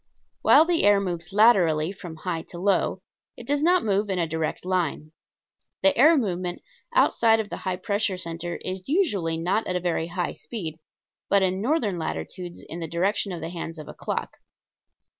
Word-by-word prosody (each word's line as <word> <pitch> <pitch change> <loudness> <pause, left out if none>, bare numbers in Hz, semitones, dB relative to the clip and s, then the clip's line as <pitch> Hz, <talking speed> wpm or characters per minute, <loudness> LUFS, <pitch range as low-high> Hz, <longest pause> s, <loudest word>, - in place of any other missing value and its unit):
While 315 - +7
the 340 -1 +2
air 205 0 +6
moves 175 -3 -4
laterally 185 -7 +4
from 180 -4 -9
high 165 0 -3
to 175 - -9
low, 190 0 +1 0.3
it 240 - -9
does 285 +3 +1
not 355 +3 +4
move 205 0 +1
in 190 - 0
a 170 - +1
direct 160 +1 -3
line. 170 -4 -1 0.7
The 290 -1 +5
air 310 +5 +6
movement 180 -7 -2 0.3
outside 230 - +4
of 215 -1 -4
the - - -4
high 185 -1 -2
pressure 200 +1 -1
center 170 0 -4
is 185 +2 -5
usually 205 - +1
not 185 +7 0
at 180 - -2
a - - +1
very 170 -2 -1
high 175 0 -3
speed, 165 -9 -6 0.5
but 200 -1 +4
in 185 +1 0
northern 225 - 0
latitudes 160 - -5
in 170 - -6
the 165 - -4
direction 190 +5 0
of 175 - -5
the 165 - -4
hands 165 -1 -6
of 155 - -9
a - - -8
clock. - - -4
185 Hz, 185 wpm, -25 LUFS, 170-210 Hz, 0.7 s, While